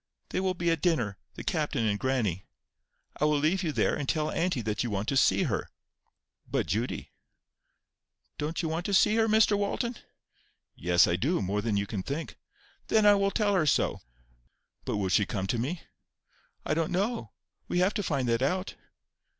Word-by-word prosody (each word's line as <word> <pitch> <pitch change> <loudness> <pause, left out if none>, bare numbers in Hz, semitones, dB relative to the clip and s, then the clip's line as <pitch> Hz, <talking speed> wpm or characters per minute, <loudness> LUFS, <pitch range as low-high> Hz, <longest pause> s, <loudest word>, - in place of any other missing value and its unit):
They - - -1
will 185 -1 0
be 170 -1 +1
at 165 -3 -1
dinner—the 125 - -2
captain 150 - -1
and 105 -1 0
grannie. 110 -9 -1 0.7
I 150 - +1
will 150 -1 +3
leave 155 +6 +1
you 165 -4 -1
there, 115 -7 +1
and 140 -3 -3
tell 155 -1 0
auntie 165 -8 0
that 105 +1 -1
you 120 - -2
want 100 +1 -2
to 140 - 0
see 135 - +4
her." - - -2 0.8
"But, - - 0
Judy,— 110 +10 -3 0.6
" - - -51
"Don't 155 +4 -2
you - - 0
want 165 +2 -2
to 200 - +1
see 215 +3 +4
her, 225 0 +3
Mr 215 -1 +4
Walton?" 215 +4 -1 0.8
"Yes, 90 +2 +4
I 85 - 0
do; 145 - +1
more 100 +2 -1
than 110 -2 0
you 100 - 0
can 100 -2 -4
think." 140 - -5 0.5
"Then 215 -1 +3
I 205 - +8
will 200 0 +2
tell 205 0 +1
her 170 -5 +2
so." - - +1 0.8
"But - - -1
will 95 -2 -1
she 95 +3 +3
come 95 -2 -2
to 115 +4 -1
me?" 155 +9 -3 0.8
"I - - 0
don't 160 0 0
know. 210 +6 -1 0.3
We - - -1
have 185 +4 +3
to 205 - -1
find 140 -9 -1
that 115 +1 +1
out." 185 +8 0
150 Hz, 190 wpm, -28 LUFS, -, 0.8 s, I